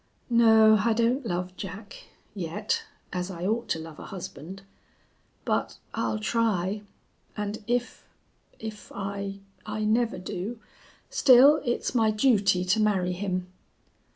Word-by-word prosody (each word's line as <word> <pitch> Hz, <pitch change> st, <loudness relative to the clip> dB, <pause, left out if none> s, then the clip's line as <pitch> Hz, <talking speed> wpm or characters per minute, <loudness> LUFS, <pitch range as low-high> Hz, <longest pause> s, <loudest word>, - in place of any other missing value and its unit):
"No, 220 Hz, -2 st, +6 dB
I 230 Hz, 0 st, +3 dB
don't 235 Hz, +3 st, +1 dB
love 180 Hz, -1 st, -3 dB
Jack 200 Hz, +2 st, -8 dB, 0.3 s
yet 200 Hz, +2 st, -2 dB, 0.3 s
as 180 Hz, +1 st, -2 dB
I 175 Hz, -1 st, -5 dB
ought 225 Hz, +4 st, 0 dB
to -, -, +1 dB
love 160 Hz, -1 st, -9 dB
a -, -, -9 dB
husband. 190 Hz, -1 st, -8 dB, 0.8 s
But -, -, -1 dB, 0.2 s
I'll 110 Hz, -2 st, -1 dB
try, 205 Hz, -, 0 dB, 0.6 s
and 210 Hz, +1 st, -4 dB
if 245 Hz, 0 st, -1 dB, 0.5 s
if 220 Hz, -1 st, -8 dB
I 200 Hz, 0 st, -4 dB, 0.2 s
I 215 Hz, 0 st, -4 dB
never 225 Hz, +2 st, +1 dB
do 190 Hz, +5 st, -5 dB, 0.5 s
still, 275 Hz, +4 st, +7 dB
it's 240 Hz, -1 st, -1 dB
my 225 Hz, -3 st, +3 dB
duty 205 Hz, -5 st, +3 dB
to 185 Hz, +4 st, +2 dB
marry 195 Hz, -4 st, +2 dB
him." 185 Hz, -1 st, -3 dB
205 Hz, 125 wpm, -27 LUFS, 185-225 Hz, 0.8 s, still